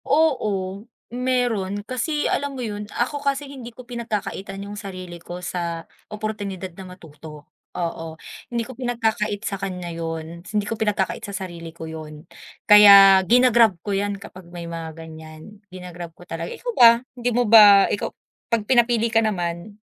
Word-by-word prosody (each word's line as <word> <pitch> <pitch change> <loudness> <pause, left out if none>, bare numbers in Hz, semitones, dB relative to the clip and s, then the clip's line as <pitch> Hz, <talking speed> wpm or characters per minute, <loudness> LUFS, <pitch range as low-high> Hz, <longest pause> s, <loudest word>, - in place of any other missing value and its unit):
Oo, 210 -10 0 0.3
mayron. 240 -6 -1
Kasi 295 +5 -2
alam 280 -1 -1
mo - - -5
'yon, 210 -1 -6
ako 280 +6 -2
kasi 280 0 -1
hindi 265 -4 -9
ko 245 +1 -13
pinagkakaitan 210 -4 -5
yung 205 - -8
sarili 185 -4 -8
ko 175 +1 -8
sa 170 -2 -4 0.2
oportunidad 205 -4 -5
na 185 +1 -11
matuto. 150 -2 -13 0.3
Oo, 165 -2 -5 0.3
hindi 235 -1 -2
ko 260 - -9
pinagkakait 225 -4 -2
sa 195 -3 -4
kanya 180 -3 -5
'yon. 165 0 -6
Hindi 210 +1 -2
ko 215 - -3
pinagkakait 210 -3 -1
sa 200 - -7
sarili 170 -2 -9
ko 165 0 -9
'yon. 155 -1 -9 0.4
Kaya 200 -2 +9
gina-grab 235 -5 +5
ko 205 - -2
'yan 200 +1 -1
kapag 185 -3 -13
may 175 -1 -8
mga 165 -1 -6
ganiyan, 160 +5 -12
gina-grab 180 -2 -9
ko 175 - -14
talaga. 165 -1 -5
Ikaw - - -5
ba? 235 - +8 0.2
Hindi 245 -1 -2
mo 245 +1 +1
ba 205 -3 +8
ikaw 205 - -2 0.4
'pag 230 -3 0
pinapili 240 -1 +3
ka 225 - +5
naman, 180 -1 -3
200 Hz, 160 wpm, -22 LUFS, 175-230 Hz, 0.4 s, Kaya